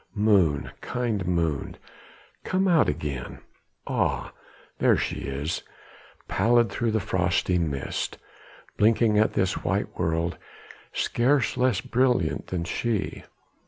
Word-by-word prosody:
Moon, 100 Hz, -9 st, +3 dB
kind 115 Hz, -7 st, -2 dB
moon, 85 Hz, -5 st, -1 dB, 0.7 s
come 190 Hz, +1 st, +1 dB
out 170 Hz, -4 st, +4 dB
again! 70 Hz, -4 st, -4 dB, 0.5 s
ah, -, -, -1 dB, 0.5 s
there -, -, +4 dB
she -, -, -2 dB
is, 70 Hz, +5 st, -3 dB, 0.7 s
pallid 120 Hz, -2 st, +3 dB
through 115 Hz, +3 st, -1 dB
the 110 Hz, 0 st, +1 dB
frosty 90 Hz, -1 st, +1 dB
mist, 70 Hz, -5 st, -3 dB, 0.6 s
blinking 110 Hz, 0 st, +4 dB
at 110 Hz, -, +3 dB
this 95 Hz, -, 0 dB
white -, -, -2 dB
world 85 Hz, +1 st, 0 dB, 0.5 s
scarce 130 Hz, +3 st, +1 dB
less 125 Hz, 0 st, +2 dB
brilliant 125 Hz, -10 st, +1 dB
than 90 Hz, -2 st, -2 dB
she. 110 Hz, +5 st, -2 dB
100 Hz, 110 wpm, -26 LUFS, 85-120 Hz, 0.7 s, out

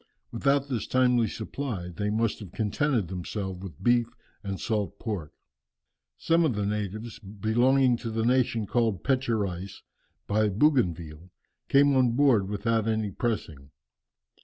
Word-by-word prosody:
Without 140 Hz, +3 st, +1 dB
this 125 Hz, -5 st, -3 dB
timely 125 Hz, -3 st, +3 dB
supply, 110 Hz, -6 st, -5 dB
they 105 Hz, +4 st, -3 dB
must 110 Hz, +1 st, 0 dB
have 100 Hz, -5 st, -10 dB
contented 115 Hz, -, 0 dB
themselves 95 Hz, +1 st, -5 dB
with 95 Hz, 0 st, -10 dB
beef 120 Hz, 0 st, +3 dB, 0.4 s
and 100 Hz, -2 st, -4 dB
salt 105 Hz, -5 st, -2 dB
pork." 100 Hz, -10 st, -4 dB, 0.9 s
Some 165 Hz, +1 st, +2 dB
of 145 Hz, -8 st, +1 dB
the 105 Hz, -1 st, -1 dB
natives, 105 Hz, +3 st, -4 dB
belonging 120 Hz, +5 st, +2 dB
to 115 Hz, -, -5 dB
the 110 Hz, 0 st, -1 dB
nation 120 Hz, -3 st, +2 dB
called 110 Hz, -3 st, 0 dB
"Pecherais" 105 Hz, -8 st, -1 dB, 0.4 s
by 105 Hz, +1 st, +2 dB
Bougainville, 90 Hz, -, 0 dB, 0.4 s
came 140 Hz, 0 st, +5 dB
on 125 Hz, -3 st, +3 dB
board 120 Hz, -7 st, +3 dB
without 110 Hz, +2 st, 0 dB
any 110 Hz, -2 st, 0 dB
pressing. 80 Hz, -, -3 dB
110 Hz, 135 wpm, -27 LUFS, 100-125 Hz, 0.9 s, came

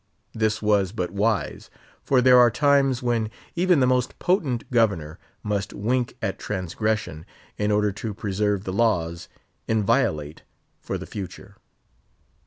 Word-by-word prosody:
This 110 Hz, -1 st, 0 dB
was 100 Hz, -3 st, +2 dB
but 90 Hz, -6 st, -3 dB
wise; 105 Hz, +1 st, -1 dB, 0.3 s
for 130 Hz, -2 st, +2 dB
there 125 Hz, -1 st, +7 dB
are 120 Hz, -1 st, +7 dB
times 135 Hz, 0 st, +2 dB
when 115 Hz, -3 st, 0 dB, 0.3 s
even 175 Hz, -3 st, +3 dB
the -, -, +5 dB
most 125 Hz, 0 st, 0 dB
potent 150 Hz, -, 0 dB
governor 100 Hz, -9 st, +1 dB, 0.2 s
must 105 Hz, -1 st, -2 dB
wink 120 Hz, +4 st, -1 dB
at 100 Hz, -2 st, -2 dB
transgression 95 Hz, -3 st, -2 dB, 0.4 s
in 105 Hz, 0 st, +1 dB
order 105 Hz, 0 st, +2 dB
to 105 Hz, +1 st, -6 dB
preserve 100 Hz, -1 st, -1 dB
the 95 Hz, -, -4 dB
laws 90 Hz, -6 st, 0 dB, 0.4 s
inviolate 100 Hz, -, 0 dB, 0.4 s
for -, -, -4 dB
the -, -, -7 dB
future. 95 Hz, -4 st, -8 dB
110 Hz, 135 wpm, -24 LUFS, 100-125 Hz, 0.4 s, there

